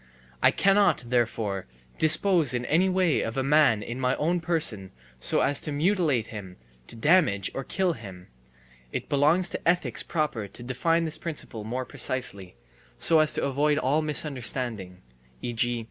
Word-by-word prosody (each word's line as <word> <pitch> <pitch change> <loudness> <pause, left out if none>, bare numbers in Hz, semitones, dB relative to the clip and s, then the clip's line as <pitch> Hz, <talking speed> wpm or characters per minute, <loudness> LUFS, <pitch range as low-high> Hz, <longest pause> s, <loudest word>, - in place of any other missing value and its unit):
I - - +6
cannot, 195 -11 +1
therefore, 110 - -1 0.3
dispose 155 -3 +5
in 120 0 -3
any 180 +8 +2
way 185 -4 +1
of 115 +3 -5
a 135 - 0
man 140 -7 +3
in 120 +2 -7
my 130 0 0
own 175 +4 -1
person 155 - 0 0.3
so - - +2
as 140 - +1
to 150 - -5
mutilate 155 - 0
him, 95 -4 -9 0.3
to - - -8
damage 115 - +2
or 135 - -5
kill 180 +6 -1
him. 95 - -11 0.7
(It - - -5
belongs 150 +6 +3
to - - -5
ethics 175 +1 +2
proper 150 -10 -3
to 100 +5 -12
define 165 +7 0
this 155 -1 -3
principle 150 -9 -6
more 125 +3 -4
precisely, 125 - -2 0.4
so 160 - +4
as 155 -1 +3
to - - -2
avoid 145 +2 0
all 145 +2 +1
misunderstanding, 125 - -1 0.4
e. 120 - -4
g. 120 +1 0
135 Hz, 160 wpm, -26 LUFS, 115-160 Hz, 0.7 s, I